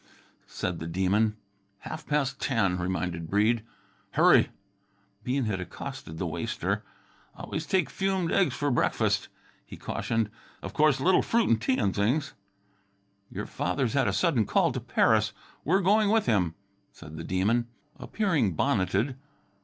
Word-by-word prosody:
said 90 -2 -3
the 80 - -5
Demon. 100 +5 +1 0.4
"Half 155 - -7
pas' 145 -2 +1
ten," 105 -10 0
reminded 85 -2 -3
Breede. 110 +4 +2 0.5
"Hurry!" - - +5 0.7
Bean 125 +2 0
had 100 -4 -2
accosted 80 -2 -7
the 90 - -2
waster. 85 0 -2 0.5
"Always 160 0 -5
take 190 -2 +2
fumed 190 -3 -1
eggs 190 - +2
for 145 -1 0
breakfast," 120 - +1 0.4
he - - -11
cautioned. 115 -2 -2 0.3
"Of - - -6
course, 150 -3 +3
little 180 +7 +4
fruit 230 0 +1
an' 115 - +5
tea 130 +4 +1
an' 100 -7 +1
things." 130 +9 0 1.0
"Your - - -5
father's - - -1
had - - +2
a - - +2
sudden - - +2
call - - +3
to - - -3
Paris. - - +2 0.3
We're 190 +6 +2
going 205 +3 +3
with 220 0 +3
him," 90 -8 +1 0.4
said 75 -1 -12
the 80 - -6
Demon, 105 +7 +1 0.3
appearing 150 - 0
bonneted. 105 - 0
115 Hz, 145 wpm, -28 LUFS, 95-150 Hz, 1.0 s, Hurry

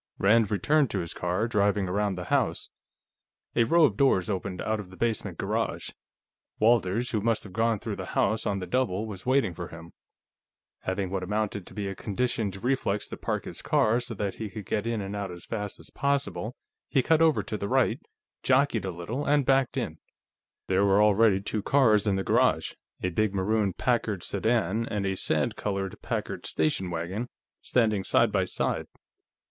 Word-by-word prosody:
Rand 110 +1 +4
returned 145 +6 +2
to 100 - -2
his 85 -1 -5
car, 90 +6 -1
driving 105 -3 +1
around 100 +1 0
the 90 - -5
house. - - +1 0.9
A 115 - +4
row 165 +7 +4
of - - 0
doors 120 -8 +3
opened 95 -1 -3
out 110 0 -1
of 100 -3 -8
the 95 - -13
basement 115 -2 -1
garage; - - -2 0.7
Walters, 115 0 +2
who 110 - 0
must 115 0 +1
have 100 - -11
gone 115 +1 +2
through - - -5
the - - -7
house 110 +2 +2
on 100 - 0
the 95 - -4
double, 110 -3 0
was 105 0 -8
waiting 130 -8 +2
for 85 +1 -6
him. 85 0 -11 0.9
Having 95 0 -2
what 95 -1 -1
amounted 105 0 -2
to 105 -2 -5
a 95 - -3
conditioned 105 -1 -2
reflex 125 -6 0
to - - -5
park - - -2
his - - -6
car 115 +3 +2
so 120 -2 -5
that 100 -1 -2
he 110 -2 -5
could 105 0 -8
get 105 +4 -1
it 105 -4 -2
out 100 -1 -3
as 85 -1 -9
fast 105 -3 -4
as - - -14
possible, 140 -4 -1 0.3
he 135 -4 +2
cut 160 +3 +3
over 160 -2 +4
to - - -4
the 100 -1 -3
right, 130 -1 +2 0.4
jockeyed 130 -6 +2
a - - -2
little, 95 +11 -4
and 145 -1 +2
backed 135 0 +2
in. 90 -11 -3 0.7
There 95 +1 +2
were 100 0 +4
already 105 -1 +4
two 105 +1 -2
cars 110 -4 +4
in 100 - +3
the 95 - -1
garage; - - +2 0.3
a 90 - +1
big 105 +2 0
maroon 100 0 +1
Packard 110 -4 0
sedan, 110 +1 0
and 105 -2 -2
a 95 0 0
sand - - 0
colored 100 -2 -3
Packard - - -3
station 80 +4 0
wagon, 90 +8 -3 0.3
standing 110 -5 +1
side - - +3
by - - +1
side. - - -1
105 Hz, 185 wpm, -27 LUFS, 95-115 Hz, 0.9 s, Rand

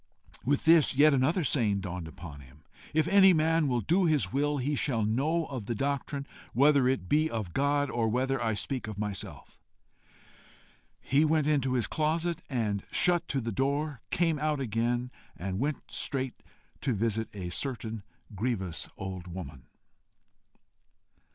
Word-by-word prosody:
With 140 +2 0
this, 160 -4 +5
yet 150 +2 +6
another 145 +7 +2
saying 110 -9 +1
dawned 90 -3 -5
upon, 80 -2 -10
him: 70 +3 -18 0.3
IF 155 0 +2
ANY 195 -1 +7
MAN 160 -1 +2
WILL 125 -3 +1
DO 175 - +2
HIS 155 -5 +1
WILL, 145 +2 +1
HE 140 +3 -1
SHALL 120 -6 0
KNOW 150 +10 +1
OF 130 -8 -6
THE 120 - -1
DOCTRINE, 140 +2 -2 0.3
WHETHER 140 +1 +4
IT 100 -9 -1
BE 155 - +2
OF 105 - -4
GOD, 145 0 +1
OR 115 -2 0
WHETHER 130 +2 0
I 110 -2 0
SPEAK 125 +4 -3
OF 105 -2 -6
MYSELF. 105 -2 -5 1.4
He 140 +3 +2
went 155 -1 +2
into 140 -4 +1
his 125 -3 +2
closet 165 +2 -1
and 110 -7 -1
shut 175 -1 +2
to 135 - -1
the 115 -2 -3
door 140 +3 -1
came 165 -3 +1
out 150 -1 0
again, 120 +1 -1 0.3
and 95 +2 -3
went 145 +2 -3
straight 130 -2 -2 0.4
to 130 -4 0
visit 110 +1 -1
a 90 -3 -5
certain 115 -1 -3 0.3
grievous 95 -6 -2
old 95 -2 -6
woman. 80 -8 -8
130 Hz, 155 wpm, -29 LUFS, 110-150 Hz, 1.4 s, ANY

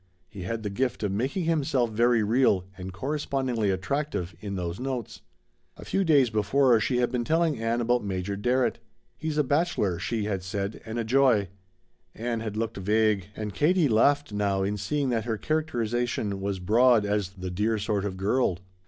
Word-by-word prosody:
He 100 +1 -10
had 110 +5 -4
the 105 - -3
gift 125 +2 -1
of 105 - 0
making 130 - -1
himself 140 -7 +1
very 115 +1 +3
real 105 -4 +2
and 95 0 -7
correspondingly 130 -1 -1
attractive 95 - -2
in 100 -1 -5
those 90 0 -4
notes. 130 -4 -4 0.6
A - - -10
few 195 - 0
days 140 -8 +4
before 120 +3 +3
she 125 +4 0
had 120 -1 +1
been 125 -2 -1
telling 160 0 +1
Ann 115 +1 0
about 120 0 +1
Major 95 0 -3
Darrett. 125 +5 +1 0.4
"He's 155 -1 -4
a 150 - +4
bachelor," 140 - 0
she 110 +2 -2
had 100 -3 -2
said, 100 +2 -4
"and 110 +1 -4
a 115 - 0
joy." 115 -5 +3 0.7
Ann 115 0 -2
had 110 -2 -5
looked 110 -1 -2
vague, 105 0 +1
and 105 -2 -5
Katie 160 - +3
laughed 140 +2 +2
now 100 -2 0
in 100 +2 -1
seeing 140 +7 -1
that 115 -3 -1
her 115 -2 -1
characterization 120 -9 -1
was 100 0 -2
broad 110 +4 +4
as 100 -2 0
"the 95 -1 -7
dear 105 +5 0
sort 105 -1 -1
of 95 -2 -4
girl." 100 -1 +1
110 Hz, 180 wpm, -27 LUFS, 100-130 Hz, 0.7 s, days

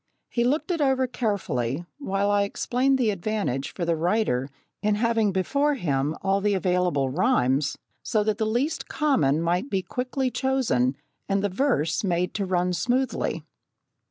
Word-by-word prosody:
He 235 - +1
looked 290 +9 0
it 335 -3 -1
over 265 -2 +3
carefully, 175 - -2
while 200 -6 0
I 205 0 +3
explained 250 +6 +1
the 235 -5 +2
advantage 195 -9 -2
for 175 - -3
the 170 0 +1
writer 165 - 0 0.3
in 210 0 +2
having 225 -1 +2
before 280 +11 +1
him 145 - -1
all 195 0 +2
the 205 0 +2
available 180 -7 +1
rhymes, 145 - +1 0.2
so 215 -2 0
that 215 0 -1
the 220 - +1
least 245 +8 -1
common 165 - +1
might 175 +10 0
be 190 -5 -1
quickly 255 +3 -2
chosen 230 - +1 0.3
and 195 0 +1
the 205 - +1
verse 190 - 0
made 180 -2 0
to 200 -2 -2
run 180 0 +1
smoothly. 250 +7 -1
200 Hz, 155 wpm, -25 LUFS, 170-250 Hz, 0.3 s, over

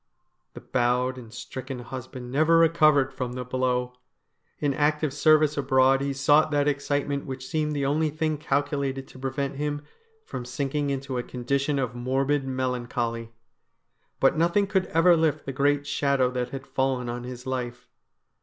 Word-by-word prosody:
The - - -8
bowed 125 +1 0
and 115 -3 -12
stricken 130 +2 -7
husband 125 0 -8
never 155 +4 +4
recovered 155 -5 +4
from 125 -2 -4
the 125 0 -5
blow. 125 0 -1 0.6
In 145 -2 0
active 150 0 +1
service 155 0 +4
abroad 135 -1 +3
he 140 0 -1
sought 145 +3 +4
that 145 -1 +1
excite 145 0 0
ment 140 -1 -3
which 130 -1 -6
seemed 150 -1 -1
the 140 -1 0
only 155 +3 +1
thing 155 0 -1
calculated 140 -2 -1
to 130 - -13
prevent 135 +1 -3
him 145 0 -2 0.4
from 125 - -6
sinking 140 +3 -2
into 135 -2 -2
a - - -3
condition 140 +4 -1
of 125 -3 -1
morbid 135 +3 0
melancholy. 120 -3 -2 0.9
But 135 - +4
nothing 170 +5 +2
could 190 -2 0
ever 170 +2 +5
lift 160 -3 +1
the 135 - -4
great 145 +1 +2
shadow 140 -3 +1
that 125 -1 -2
had 135 0 -7
fallen 130 -2 -1
on 120 0 -4
his 125 0 -8
life. 125 -2 -4
135 Hz, 165 wpm, -26 LUFS, 125-145 Hz, 0.9 s, ever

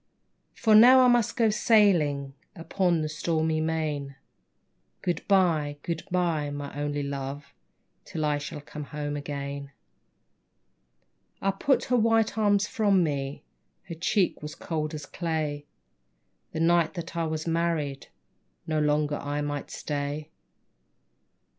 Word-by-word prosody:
For 220 - +2
now 250 +4 +9
I 255 - +6
must 240 -3 +2
go 225 -3 +4
sailing 170 -11 +3 0.2
Upon 170 -1 0
the - - -1
stormy 160 0 0
main; 155 -4 -2 0.9
Good 175 -3 -1
bye, 165 -7 +2
good 170 -1 -3
bye, 170 -5 0
my 145 0 -6
only 145 0 -2
Love, 140 0 -5 0.5
Till 155 -2 -3
I 145 -1 +1
shall 145 +1 -7
come 145 0 -8 0.3
again. 140 -1 -5 1.7
I 195 - +1
put 265 +8 +1
her 250 - +1
white 225 -2 +2
arms 205 -2 +3
from 200 -6 +2
me, 140 -3 -3 0.4
Her 170 - -8
cheek 180 +3 0
was 150 0 -7
cold 155 -2 -3
as 150 -1 -7
clay. 155 -4 -3 0.8
The 160 - -3
night 170 +1 +3
that 170 0 -6
I 165 -1 0
was 155 0 -3
married 165 -4 -1 0.6
No 155 -1 0
longer 150 0 +1
I 145 +1 -3
might 145 -1 -4
stay. 145 +1 -4
155 Hz, 130 wpm, -27 LUFS, 145-180 Hz, 1.7 s, now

